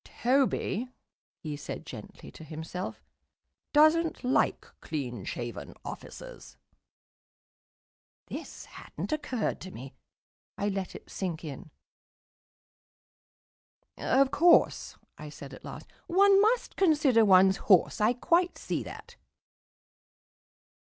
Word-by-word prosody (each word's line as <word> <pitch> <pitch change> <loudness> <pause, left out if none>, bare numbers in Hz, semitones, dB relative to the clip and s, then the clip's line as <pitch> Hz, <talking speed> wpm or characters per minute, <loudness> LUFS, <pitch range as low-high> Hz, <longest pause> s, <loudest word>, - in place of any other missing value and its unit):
"Toby," 255 -2 +1 0.6
he 150 -2 -4
said 145 - -7
gently - - -10
to - - -12
himself, 160 +4 -6 0.7
"doesn't 310 +2 +4
like 250 +1 +1 0.2
clean 125 -9 -4
shaven 115 - -6
officers." - - -10 1.7
This - - -8
hadn't 180 +6 -8
occurred 260 -7 -2
to 185 - -7
me; 135 -5 -10 0.6
I 205 - 0
let 195 -2 -4
it - - -12
sink 175 -4 -4
in. 150 -1 -8 2.3
"Of 270 +1 +2
course," 345 +3 +3 0.2
I 150 - -8
said 140 -1 -10
at - - -12
last, - - -10 0.2
"one 395 +2 +5
must 460 +3 +1
consider 295 - +4
one's 190 -1 +6
horse. 190 +1 +3
I 215 +3 +4
quite 345 +8 +1
see - - -3
that." - - -10
205 Hz, 105 wpm, -29 LUFS, -, 2.3 s, one's